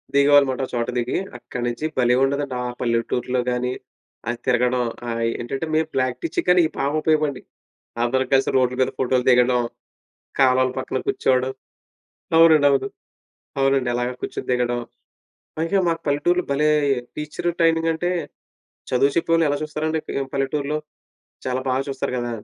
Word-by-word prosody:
దిగేవాళ్లమాట. 140 -2 +5
ఒక - - -13
చోట 120 +1 -1
దిగి 120 +1 -1 0.2
అక్కడ్నుంచి 120 +3 -4
భలే 125 0 +4
ఉండేదండి. 140 -1 -1
ఆ - - -3 0.2
పల్లెటూరులో 125 +1 0
గాని 125 +1 -1 0.6
అది 120 - -2
తిరగడం, 125 0 +2 0.3
ఆహ్, 115 0 -2 0.2
ఏంటంటే 135 +6 -3
మేము 160 0 +2
ప్రాక్టీస్ 130 +4 -1
చేసినవిక్కడ 175 -3 +3
బాగుపయోగపడినయి 150 -1 0 0.6
అందరం 130 +2 +1
కలిసి 135 0 +3
రోడ్‌ల 125 -1 +2
మీద 130 - +2
ఫోటో‌లు 125 -1 +1
దిగడం, 125 0 +4 0.8
కాలవల 130 -1 +4
పక్కన 130 0 -2
కూర్చోవడం 130 0 +1 0.9
అవునండి. 160 -3 +7
అవును. 135 -1 +1 0.7
అవునండి. 135 -2 +2
అలాగే 125 +1 -1
కూర్చొని - - -5
దిగడం. 120 -1 0 0.8
పైగా 165 +5 +1
మాకు 165 0 -1
పల్లెటూర్‌లో 175 +5 +1
భలే! 150 +2 +2 0.5
టీచరు 150 +3 -2
ట్రైనింగ్ 165 0 +3
అంటే 175 +3 -1 0.8
చదువు 140 +2 +3
చెప్పేవాళ్ళని 165 -2 +2
ఎలా 145 - -1
చూస్తారండి 155 +1 -2 0.2
ఆహ్, 135 - -11
పల్లెటూరులో? 140 +2 -1 0.7
చాలా 130 0 -1
బాగా 130 +1 +1
చూస్తారు 135 -1 -3
గదా? 120 0 -3
135 Hz, 135 wpm, -22 LUFS, 125-155 Hz, 0.9 s, అవునండి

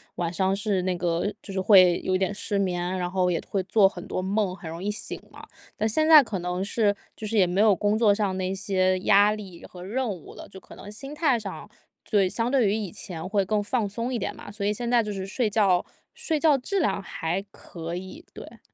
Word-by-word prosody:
晚 170 -1 -2
上 190 +1 +1
是 200 -2 0
那 185 0 -1
个， 170 -1 -1 0.2
就 195 - -8
是 190 - -1
会 185 -3 +6
有 185 0 +1
点 190 +1 -1
失 200 0 -2
眠， 180 -1 -1
然 180 0 -2
后 180 -1 +1
也 165 - 0
会 195 -2 -1
做 195 +1 +4
很 180 -2 -7
多 185 - -3
梦， 195 0 0
很 180 -3 -9
容 165 +3 -7
易 210 - -1
醒 210 - -5
嘛。 - - -12 0.4
但 220 - +1
现 310 +8 +1
在 315 -2 +9
可 210 -7 -4
能 180 +1 -3
是 205 0 +1 0.2
就 220 - -7
是 215 +1 -1
也 185 - +5
没 185 +4 +1
有 215 -2 +6
工 205 +3 +1
作 220 -3 +4
上 200 -2 -1
的 185 - -2
一 185 +1 -1
些 185 -2 +1
压 205 +2 +5
力 195 -5 -8
和 180 - -12
任 235 +6 -2
务 180 -6 -8
了， - - -11
就 190 - -11
可 - - -15
能 205 - -10
心 275 +7 -8
态 290 -7 +2
上 200 -3 -8 0.4
对， 200 -3 +4
相 230 +5 -2
对 255 -6 +3
于 195 - +1
以 210 -5 -4
前 180 -6 -7
会 200 -1 +1
更 210 +1 0
放 220 0 -1
松 230 +5 -4
一 240 - -1
点 - - -4
嘛， - - -10
所 205 -1 -4
以 210 - +1
现 235 +2 -3
在 240 -1 +5
就 210 -2 -4
是 190 -1 -4
睡 215 +3 -1
觉 195 -4 +2 0.3
睡 315 -2 -2
觉 300 -2 +4
质 380 +9 -1
量 275 - 0
还 175 -1 -3
可 170 0 -7
以， 190 - -8
对。 - - -11
200 Hz, 265 characters per minute, -25 LUFS, 185-220 Hz, 0.4 s, 在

